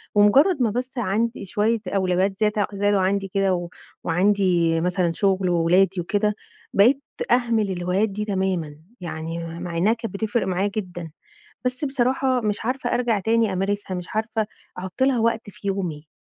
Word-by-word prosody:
ومجرَّد 265 - +5
ما 230 - +3
بس 250 +3 -4
عندي 225 0 -1
شوية 215 +4 +1
أولويات 190 0 0
زيادة 210 -1 +1
زادوا 205 0 +2
عندي 195 +1 0
كده، 195 0 +1
و 175 -1 -3 0.3
وعندي 175 -2 +2
مثلًا 180 0 +1
شغل 190 +1 +1
وولادي 175 +2 +3
وكده، 210 +4 0 0.4
بقيت 250 +8 +5 0.3
أهمل 230 -4 +2
الهوايات 180 +4 0
دي 210 +2 -4
تمامًا، 190 -7 -1 0.3
يعني 165 0 -5
مع 175 -1 -4
إنَّها 200 +6 +3
كانت 230 -2 -6
بتفرق 210 0 -1
معايا 190 +2 0
جدًا، 175 -6 -5 0.5
بس 250 +3 -1
بصراحة 260 -1 +1
مش 210 0 -1
عارفة 250 0 -1
أرجع 240 -3 +1
تاني 225 +1 +2
أمارسها، 195 +1 -2
مش 180 -1 -5
عارفة 220 0 -1 0.3
احط 185 +7 -4
لها 265 -2 +3
وقت 225 -1 0
في 200 - -7
يومي. 175 -6 -3
200 Hz, 155 wpm, -23 LUFS, 180-225 Hz, 0.5 s, ومجرَّد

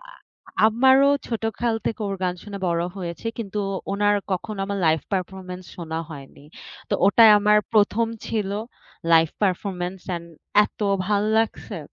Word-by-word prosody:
আ - - -14 0.5
আমারও 265 +5 +5 0.2
ছোটকাল 225 0 -1
থেকে 225 - -2
ওর 195 - -3
গান 180 -1 0
শুনে 200 -1 -7
বড় 170 0 0
হয়েছি, 175 +3 -6
কিন্তু 210 -2 -3 0.3
ওনার 205 +1 +2 0.2
কখনো 200 +3 -4
আমার 200 0 -3
লাইভ 160 0 +3
পারফরম্যান্স 185 -1 -4
শোনা 160 -2 -4
হয়নি। 140 -1 -11 0.4
তো - - 0
ওটাই 220 +2 +7
আমার 210 +1 +4
১ম 215 +2 +3 0.2
ছিল 210 -3 -2 0.6
লাইভ 165 0 +6
পারফরম্যান্স 185 -1 -1
অ্যান্ড 170 -2 -4 0.4
এতো 205 0 -4 0.2
ভাল 205 0 +1 0.2
লাগছে 225 0 -2
200 Hz, 140 wpm, -23 LUFS, 180-215 Hz, 0.6 s, ওটাই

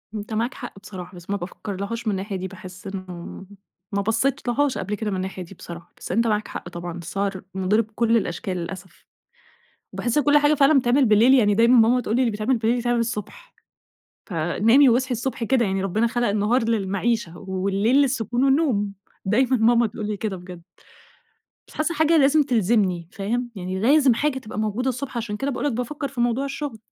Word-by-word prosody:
أنت 210 +1 -5
معاك 230 +4 -1
حق 245 -6 -9
بصراحة 185 -2 -9
بس 175 +1 -13
ما 200 - 0
بافكر 195 +2 -6
لهاش 220 +4 -4
من - - +3
الناحية 195 +1 -3
دي، 185 0 -3
باحس 185 +1 -11
إنه 185 -1 -7 0.5
ما 200 - 0
بصيتلهاش 250 +5 0
قبل 205 +3 -3
كده 210 0 -3
من 190 - -2
الناحية 185 0 -4
دي 180 +3 -13
بصراحة، 170 0 -11
بس - - -7
أنت 230 +1 +2
معاك 210 -1 0
حق - - -7
طبعًا، 175 0 -6
السهَر 190 +3 -3
مُضِر 190 +4 +2
بكل 230 +1 +1
الأشكال 185 -1 -3
للأسف، 175 0 -8 0.9
وباحس 240 +4 -1
إن - - +1
كل 295 0 +6
حاجة 295 +1 +4
فعلًا 280 +1 +5
بتتعمل 255 +2 +3
بالليل 220 +5 +5
يعني 210 -6 +4
دايمًا 235 +2 +5
ماما 240 +3 +4
تقول 220 -1 -1
لي: 255 - +3
"اللي 240 -3 +2
بيتعمل 215 +5 0
بالليل 230 +2 +1
يتعمل 240 0 0
الصبح، 230 - -5 0.7
فنامي 220 - +3
واصحي 255 +2 +1
الصبح 245 +1 -3
كده 240 0 +2
يعني، 195 -1 -1
ربنا 215 +5 +1
خلق 240 0 0
النهار 210 +4 +1
للمعيشة 200 -2 -1
والليل 195 +5 0
للسكون 250 -2 0
والنوم" 265 -8 +2 0.3
دايمًا 250 +6 +2
ماما 235 +1 +4
تقول 215 0 -6
لي 210 -1 -3
كده 200 -2 -3
بجد. 180 -1 -10 1.1
بس - - -17
حاسة 310 +2 0
الحاجة 320 +1 +3
لازم 290 +1 +5
تلزمني، 205 - +1
فاهم؟ 240 +4 -3
يعني 185 0 -4
لازم 270 +3 +5
حاجة 285 +2 0
تبقى 215 -4 -7
موجودة 215 +4 -1
الصبح، 255 0 -4
عشان 220 -3 -3
كده 275 +5 -2
باقول 275 - -3
لك 290 - +1
بافكر 265 +5 -3
في 260 -3 -4
موضوع 240 +3 +1
الشغل. 275 -4 -5
225 Hz, 190 wpm, -23 LUFS, 195-250 Hz, 1.1 s, كل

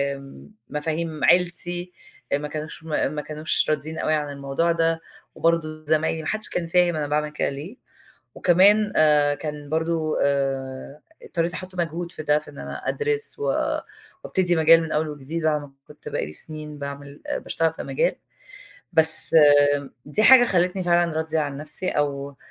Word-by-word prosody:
آمم، 135 - -13 0.2
مفاهيم 155 +1 -3
عيلتي 175 0 +1 0.4
ما 145 +1 0
كانوش 155 +1 -7
م - - -12 0.3
ما 150 - -3
كانوش 155 +2 -1
راضين 155 +2 -2
أوي 155 - 0
عن 150 -1 -1
الموضوع 140 +4 -1
ده، 165 0 +1 0.3
وبرضه 155 -2 0
زمايلي، 160 +1 +1
ما - - -5
حدش 215 0 +1
كان 170 -2 -2
فاهم 175 0 +3
أنا 150 -1 -2
باعمل 150 +1 0
كده 150 - -1
ليه. 155 - -8 0.6
وكمان 205 +4 +4
آآ، 150 -2 +4
كان 150 -2 -7
برضه 160 0 -1
آآ، 135 0 -2 0.2
اضطريت 170 0 -2
أحُط 185 0 -8
مجهود 170 0 -3
في 155 - -7
ده، 150 0 +3
في 150 - -13
إن 145 - -12
أنا - - -7
أدرس، 440 -1 -1
و - - -4 0.8
وأبتدي 180 -2 +1
مجال 165 +1 +6
من 160 - -6
أول 155 0 0
وجديد، 150 +3 -5
بعد 150 -2 +1
ما 145 -1 -12 0.2
كنت - - -11
بقى - - -2
لي 75 - -9
سنين 150 - -6
باعمل 140 0 -8 0.2
باشتغل 165 -1 -1
في - - -7
مجال. - - 0 0.8
بس 160 +1 +3
آآ، 145 -2 +5 0.2
دي 210 +9 0
حاجة 255 +2 +8
خلتني 180 -2 +1
فعلًا 175 -1 +2
راضية 160 0 -1
عن 145 -2 -3
نفسي، 155 +5 -5
أو 140 -1 -2
155 Hz, 170 wpm, -23 LUFS, 145-170 Hz, 0.8 s, حاجة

